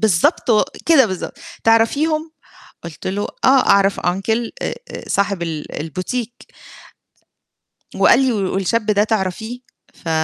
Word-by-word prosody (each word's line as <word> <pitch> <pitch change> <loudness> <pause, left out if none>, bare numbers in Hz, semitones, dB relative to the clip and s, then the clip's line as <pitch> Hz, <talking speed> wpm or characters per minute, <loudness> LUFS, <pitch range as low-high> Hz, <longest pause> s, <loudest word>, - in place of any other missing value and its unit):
بالضبط 210 +2 +2
و 215 -2 +5 0.2
كده 310 -7 +6
بالضبط 185 -3 -5 0.3
تعرفيهم؟ 305 +8 +2 0.5
قلت 170 -3 -9
له 200 +2 -1 0.2
آه 265 0 +5
أعرف 200 -1 +4
uncle 220 +6 -1
أ - - -2
أ - - -9
صاحب 200 -3 0
ال 155 -3 -5
البوتيك 215 - -5 1.5
وقال - - +5
لي: 265 -2 +2
"والشاب 195 +1 -1
ده 210 -1 +3
تعرفيه؟" 220 +3 -2 0.3
ف 165 - -8
210 Hz, 125 wpm, -19 LUFS, 185-240 Hz, 1.5 s, كده